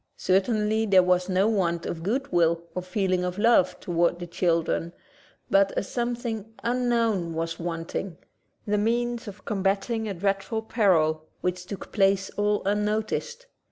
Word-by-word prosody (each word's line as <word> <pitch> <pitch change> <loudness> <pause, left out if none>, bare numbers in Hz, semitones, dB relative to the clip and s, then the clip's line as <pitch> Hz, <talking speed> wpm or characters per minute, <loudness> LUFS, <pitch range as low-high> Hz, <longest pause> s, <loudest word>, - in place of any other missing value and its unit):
Certainly 215 +3 +1
there 190 -2 +6
was 180 +1 +2
no 190 +2 +3
want 170 -6 0
of 165 - -4
good 255 +10 -2
will 170 -1 +2
or 180 - -3
feeling 185 0 0
of 180 +1 -3
love 220 -4 +3
toward 175 0 +1
the 175 - -6
children, 170 -1 0 0.6
but 195 0 +4
a - - +1
something 235 -1 -3
unknown 230 -8 +1
was 165 0 -3
wanting: 165 +1 -4 0.5
the 210 0 +1
means 235 +2 0
of 205 0 -10
combating 205 +3 0
a 195 - -4
dreadful 200 +4 -1
peril 160 -9 +2
which 180 0 -2
took 200 - -7
place 195 -1 +2
all 205 0 0
unnoticed. 215 - -1
195 Hz, 145 wpm, -26 LUFS, 175-220 Hz, 0.6 s, there